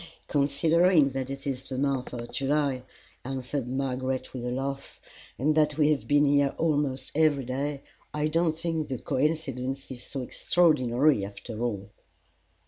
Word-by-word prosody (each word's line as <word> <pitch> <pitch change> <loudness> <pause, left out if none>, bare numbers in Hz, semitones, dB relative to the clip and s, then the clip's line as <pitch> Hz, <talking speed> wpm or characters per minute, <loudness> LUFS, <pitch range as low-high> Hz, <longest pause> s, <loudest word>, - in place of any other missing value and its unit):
"Considering 155 +2 +3
that 135 0 -3
it 135 0 -6
is 135 -1 -3
the 130 - -4
month 135 -2 0
of 120 -1 -6
July," 140 -1 0 0.4
answered 130 0 -3
Margaret 130 0 -2
with 125 -2 -5
a 125 - -2
laugh, 135 +2 -4 0.4
"and 150 +5 +2
that 150 -1 +2
we 150 -1 +4
have 145 - -1
been 145 0 +4
here 140 -1 +3
almost 145 -5 0
every 145 -4 +3
day, 140 +3 -3 0.3
I 150 0 0
don't 160 0 +1
think 165 -2 -2
the 130 -3 -3
coincidence 135 -2 -2
is 125 -2 -7
so 135 +1 -5
extraordinary, 135 - +3
after 105 +3 -7
all." 105 -4 -3
140 Hz, 150 wpm, -28 LUFS, 130-150 Hz, 0.4 s, we